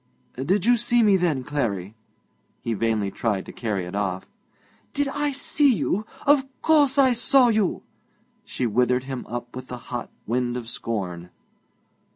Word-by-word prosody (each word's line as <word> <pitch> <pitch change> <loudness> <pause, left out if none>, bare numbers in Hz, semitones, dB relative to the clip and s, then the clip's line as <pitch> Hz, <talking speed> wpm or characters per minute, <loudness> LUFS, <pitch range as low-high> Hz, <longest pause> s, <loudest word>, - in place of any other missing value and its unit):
'Did 175 +10 0
you 245 +1 +5
see 240 +1 +3
me, 205 -2 +5
then, 165 -8 +1
Clarry?' 110 -9 -2 0.7
He 115 - -1
vainly 110 -2 0
tried 105 -4 -2
to - - -9
carry 105 -6 -3
it 90 - -8
off. 95 -3 -2 0.7
'Did 285 0 +1
I 290 +1 -1
see 290 0 +3
you? 200 +5 -1 0.2
Of 285 -1 +5 0.2
course 295 -4 +4
I 265 -2 +5
saw 250 +1 +5
you!' 215 -4 0 0.6
She 130 - -3
withered 125 +3 +2
him 130 -1 -6
up 120 +1 -6
with 130 0 -7
the 125 - -6
hot 120 0 -6 0.2
wind 120 +1 -1
of 120 -2 -7
scorn. 90 -7 -4
130 Hz, 160 wpm, -24 LUFS, -, 0.7 s, you